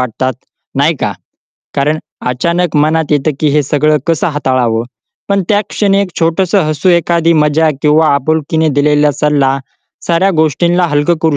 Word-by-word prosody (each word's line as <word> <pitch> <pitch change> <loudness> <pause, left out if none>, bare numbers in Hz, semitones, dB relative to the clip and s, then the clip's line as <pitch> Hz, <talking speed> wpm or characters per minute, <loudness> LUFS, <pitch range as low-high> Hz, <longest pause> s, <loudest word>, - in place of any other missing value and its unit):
वाटतात, 125 +1 -2 0.4
नाही - - +2
का? - - -1 0.6
कारण 150 +3 0 0.3
अचानक 170 +6 -1
मनात 155 +1 +1
येतं, 145 +1 +1
की 155 - +2
हे 150 +1 +2
सगळं 150 +2 +1
कसं 165 0 0
हाताळावं. 130 -6 -1 0.4
पण 200 -1 +1
त्या 205 -1 +3
क्षणी 200 -2 +1
एक 200 - -1
छोटंसं 180 +4 +1
हसू, 155 +3 -1
एखादी 170 -1 +2
मजा, 155 +1 +2
किंवा 155 +1 +3
आपुलकीने 155 +3 0
दिलेला 150 0 +3
सल्ला, 140 -2 +1 0.5
साऱ्या 175 +3 +2
गोष्टींना 170 +4 +1
हलकं 145 +4 +1
करू 160 -3 +2
155 Hz, 150 wpm, -12 LUFS, 145-170 Hz, 0.6 s, त्या